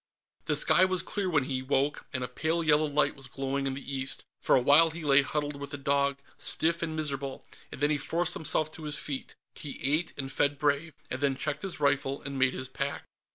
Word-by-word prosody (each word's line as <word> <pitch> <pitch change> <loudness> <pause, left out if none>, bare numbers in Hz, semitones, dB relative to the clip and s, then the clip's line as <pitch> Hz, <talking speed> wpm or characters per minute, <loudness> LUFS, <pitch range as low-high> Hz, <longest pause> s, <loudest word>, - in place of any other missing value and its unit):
The - - +1
sky - - +4
was 185 -1 +1
clear 200 -3 -2
when 150 -5 +2
he 130 -1 -2
woke, 140 +2 0
and 130 -2 -2
a - - -2
pale 160 +6 -1
yellow 155 0 +3
light 150 +1 +1
was 135 -2 -7
glowing 135 +1 -2
in 135 - -2
the 140 0 -6
east. 135 0 -1 0.2
For - - +4
a - - +5
while 145 +6 +6
he 165 +1 -7
lay 140 -1 +6
huddled 145 +1 -3
with 140 - -5
the 145 - -5
dog, 140 0 +1 0.2
stiff 170 +1 +3
and 160 -2 -2
miserable, 140 -3 -3 0.3
and - - -9
then 145 +1 +3
he 150 - +1
forced 170 +4 -1
himself 155 0 0
to 155 0 -9
his 150 -1 +2
feet. 140 -3 -5 0.2
He 145 - -7
ate, 155 +5 +1
and 135 -1 -4
fed 145 +1 +1
Brave, 145 +1 0 0.2
and 130 - -3
then 140 -2 +2
checked 150 +2 -2
his 190 -5 -4
rifle 140 -1 +1
and 135 -1 -4
made 130 0 +3
his 130 - -5
pack. - - -4
145 Hz, 230 wpm, -29 LUFS, 135-155 Hz, 0.3 s, while